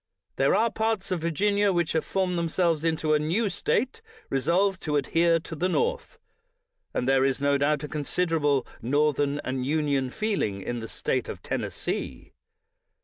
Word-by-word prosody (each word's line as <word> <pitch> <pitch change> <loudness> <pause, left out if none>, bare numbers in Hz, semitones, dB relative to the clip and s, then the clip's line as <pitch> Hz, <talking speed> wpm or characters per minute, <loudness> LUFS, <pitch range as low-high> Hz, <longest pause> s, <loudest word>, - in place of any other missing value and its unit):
There 135 +5 +3
are 225 +2 +2
parts 220 -3 -1
of 180 -3 -1
Virginia 200 +5 +2
which 175 -3 0
have 160 - +1
formed 185 -2 -1
themselves 170 -1 +1
into 160 -2 +1
a 150 - +4
new 185 +8 0
State, 255 - -1 0.3
re 135 - +1
solved 185 +6 +2
to 150 -2 -1
adhere 165 +4 +3
to 160 - -8
the 180 +4 0
North; 475 - -1 0.7
and 125 - -2
there 135 0 +4
is 135 0 +1
no 140 0 +2
doubt 150 +1 +1
a - - -3
considerable 150 -2 0 0.2
Northern 145 +2 +1
and 130 0 -2
Union 140 -2 0
feel 215 - -1
ing 100 -2 -2
in 120 +3 -3
the 115 - -6
State - - -2
of - - -7
Tennessee. - - -4
160 Hz, 170 wpm, -26 LUFS, 140-185 Hz, 0.7 s, a